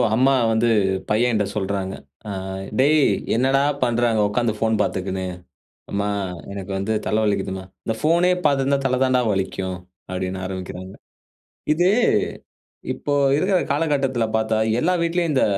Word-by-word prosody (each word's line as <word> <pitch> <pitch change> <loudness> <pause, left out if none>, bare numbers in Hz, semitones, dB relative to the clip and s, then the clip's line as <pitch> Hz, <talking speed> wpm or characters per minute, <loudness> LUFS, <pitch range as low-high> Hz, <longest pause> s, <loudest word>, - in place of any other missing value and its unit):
அம்மா 130 +3 +4 0.2
வந்து 110 +1 +2 0.4
பையன்ட்ட 110 -1 +2
சொல்றாங்க. 95 -2 -2 0.3
ஆ - - -5 0.5
"டேய்! 150 +3 +5 0.3
என்னடா 135 +3 +3 0.2
பண்ற 120 -1 +1
அங்க 110 -1 +2
உட்கார்ந்து 110 +2 0
ஃபோன் 110 0 +2
பார்த்துக்கினு" 95 0 -2 0.7
அம்மா! 100 +1 -1 0.4
"எனக்கு 100 -1 -7
வந்து 100 +3 -1
தல 110 +1 +1
வலிக்கிதும்மா" 95 -2 -1 0.2
"இந்த 115 - -1
ஃபோனே 170 +4 +3
பார்த்து 140 -2 +2
இருந்தா, 140 +1 +2
தல 130 -1 +1
தான்டா 130 -1 +3
வலிக்கும்" 95 -2 -2 0.3
அப்பிடின்னு 95 0 -3
ஆரம்பிக்கிறாங்க. 95 0 -6 0.8
இது 175 +3 +3 1.1
இப்போ 145 - -3 0.2
இருக்கிற 185 +3 +2
காலகட்டத்தில 140 -5 +1
பார்த்தா, 110 0 0 0.2
எல்லா 180 +7 +2
வீட்டிலயும் 170 -1 0
இந்த 130 - +3
115 Hz, 130 wpm, -22 LUFS, 95-135 Hz, 1.1 s, டேய்